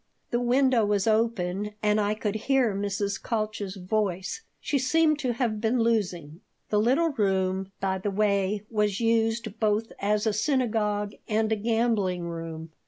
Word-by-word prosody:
The 240 - +1
window 250 -1 +3
was 205 -2 +1
open 210 -3 0
and 210 0 +3
I 205 +1 0
could 210 -1 -2
hear 245 0 +1
Mrs. 200 0 -2
Kalch's 215 -3 -3
voice. 190 - -2 0.2
She 285 - 0
seemed 305 +3 +3
to 255 -4 0
have 225 -3 -1
been 230 +2 +1
losing. 185 -8 -1 0.3
The 210 - +2
little 270 +9 +3
room, 190 -5 0
by 190 -1 -1
the 205 - -2
way, 200 0 +1
was 210 -3 +1
used 225 -1 0
both 215 +1 0
as 210 +2 +1
a 220 - +2
synagogue 215 -4 0
and 220 0 +1
a - - +3
gambling 215 -5 0
room. 165 -1 -6
210 Hz, 155 wpm, -27 LUFS, 195-230 Hz, 0.3 s, window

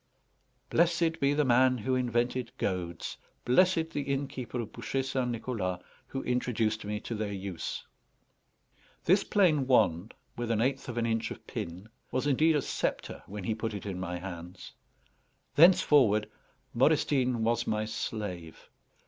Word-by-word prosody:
Blessed 165 -1 +2
be 140 +1 +2
the 150 0 +2
man 130 +1 +4
who 120 +3 -1
invented 125 0 0
goads! 85 -3 -3 0.3
Blessed 165 +5 +3
the 145 - -2
innkeeper 135 -3 -3
of 110 -2 -5
Bouchet 125 +3 -2
St. 130 -1 -1
Nicholas, 110 -6 -2 0.3
who 135 - -4
introduced 115 -3 0
me 105 0 -3
to - - -5
their 105 -2 -2
use! 95 -3 -5 1.2
This 190 +5 +4
plain 160 -10 +3
wand, 100 -6 +2 0.2
with 120 -1 -3
an 115 -2 +1
eighth 130 +3 0
of 120 - -5
an 115 - +1
inch 115 0 0
of - - -9
pin, 90 +5 -6 0.2
was 130 +2 -1
indeed 155 +3 +3
a 145 - +1
sceptre - - -3
when 100 0 -6
he 110 - 0
put 110 0 -3
it 100 - -6
in 95 -3 -4
my 90 -1 -3
hands. 90 0 -8 0.8
Thenceforward 140 - +5 0.5
Modestine 130 -3 +2
was 115 +1 +1
my 110 0 0
slave. 100 -6 -5
120 Hz, 150 wpm, -30 LUFS, 105-135 Hz, 1.2 s, Thenceforward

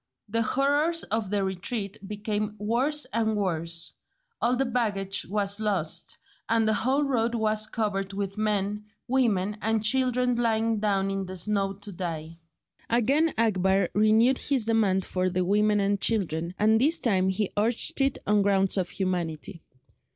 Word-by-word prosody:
The 230 +2 0
horrors 290 +7 +1
of 220 -2 -2
the 205 -1 0
retreat 195 +2 -3
became 210 0 -3
worse 250 +8 0
and 220 -1 +1
worse. 170 -4 -2 0.5
All 240 +2 +2
the 270 +2 +1
baggage 205 -6 -1
was 200 0 0
lost, 175 -6 -2 0.3
and 225 -1 +2
the 220 - +3
whole 260 +7 +1
road 240 -4 0
was 215 -1 +1
covered 200 -3 -2
with 195 0 -4
men, 210 -1 -1 0.2
women, 215 -6 +1
and 220 0 0
children 250 +1 +2
lying 225 -1 +1
down 195 -2 0
in 195 -1 -3
the 185 0 -7
snow 195 +1 0
to 205 +1 -9
die. 165 -2 -6 0.5
Again 275 +8 +2
Akbar 190 -4 +2
renewed 220 +5 +4
his 265 -6 0
demand 210 -5 +2
for 185 0 -1
the 180 0 -1
women 210 +2 +2
and 200 0 0
children, 175 -5 0
and 220 +2 +3
this 315 +5 +4
time 190 - +1
he 190 +1 -1
urged 225 +5 0
it 270 0 +2
on 210 0 +3
grounds 195 -1 +2
of 185 -2 0
humanity. 175 -2 -3
210 Hz, 155 wpm, -27 LUFS, 195-230 Hz, 0.5 s, renewed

